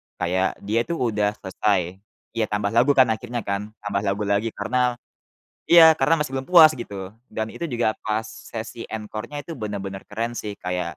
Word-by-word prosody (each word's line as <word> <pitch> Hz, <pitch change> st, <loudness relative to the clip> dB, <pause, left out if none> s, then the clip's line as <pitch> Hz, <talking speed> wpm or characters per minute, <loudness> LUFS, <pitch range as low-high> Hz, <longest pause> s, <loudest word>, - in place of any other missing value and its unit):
kayak 95 Hz, +2 st, 0 dB
dia 115 Hz, +4 st, 0 dB
itu 170 Hz, -, -2 dB
udah 105 Hz, -6 st, 0 dB
selesai, 95 Hz, -2 st, -1 dB, 0.3 s
ya 115 Hz, -1 st, -1 dB
tambah 100 Hz, -1 st, -1 dB
lagu 125 Hz, +5 st, +4 dB
kan 130 Hz, -4 st, +5 dB
akhirnya 120 Hz, 0 st, -4 dB
kan, 105 Hz, +2 st, -4 dB
tambah 100 Hz, -1 st, -1 dB
lagu 100 Hz, +2 st, 0 dB
lagi 100 Hz, +3 st, +1 dB
karena 125 Hz, +4 st, 0 dB, 0.7 s
iya, 165 Hz, -2 st, +9 dB
karena 155 Hz, +2 st, +2 dB
masih 135 Hz, -, -7 dB
belum 135 Hz, +2 st, -4 dB
puas 160 Hz, -3 st, +8 dB
gitu, 100 Hz, -6 st, -7 dB, 0.2 s
dan 110 Hz, 0 st, -4 dB
itu 170 Hz, -, -5 dB
juga 120 Hz, -3 st, +1 dB
pas 110 Hz, 0 st, -1 dB
sesi 115 Hz, +1 st, -8 dB
encore-nya 110 Hz, +6 st, -6 dB
itu 165 Hz, -, -7 dB
bener-bener 100 Hz, -5 st, -5 dB
keren 115 Hz, +3 st, -3 dB
sih 105 Hz, -3 st, -5 dB
kayak 90 Hz, -2 st, -3 dB
110 Hz, 175 wpm, -23 LUFS, 100-125 Hz, 0.7 s, iya